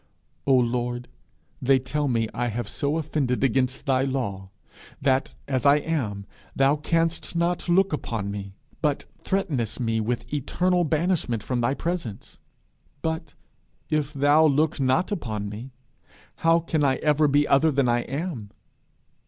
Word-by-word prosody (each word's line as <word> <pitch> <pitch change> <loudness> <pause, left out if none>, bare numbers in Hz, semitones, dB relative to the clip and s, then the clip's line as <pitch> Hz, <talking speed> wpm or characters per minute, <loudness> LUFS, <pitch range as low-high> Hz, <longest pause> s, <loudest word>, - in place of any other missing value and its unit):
'O 135 - +6
Lord, 120 0 0 0.5
they 135 +1 +4
tell 145 +3 -1
me 115 -3 +1
I 120 0 -1
have 120 -1 -3
so 145 +7 -1
offended 145 -5 -1
against 130 0 +1
thy 130 -2 +2
law 115 -8 -2 0.5
that, 135 0 +1
as 130 -2 0
I 140 0 +6
am, 130 -11 -2 0.3
thou 135 +2 +4
canst 165 +2 -1
not 175 +1 0
look 190 0 +3
upon 110 -8 -3
me, 100 -1 -6 0.3
but 150 -3 0 0.2
threatenest 155 - -1
me 115 -2 0
with 120 +5 -3
eternal 175 +5 +1
banishment 155 - 0
from 125 -2 -1
thy 120 +4 +1
presence. 165 - -5 0.6
But 160 -1 -3 0.6
if 150 -2 0
thou 145 +2 +4
look 155 0 +2
not 135 +9 +2
upon 110 - -3
me, 110 +6 -7 0.7
how 165 +1 +3
can 160 -2 0
I 135 -2 +3
ever 150 +1 +2
be 145 +1 +3
other 140 +4 +4
than 140 -2 +2
I 120 0 +3
am? 135 - -4
140 Hz, 145 wpm, -25 LUFS, 120-155 Hz, 0.7 s, O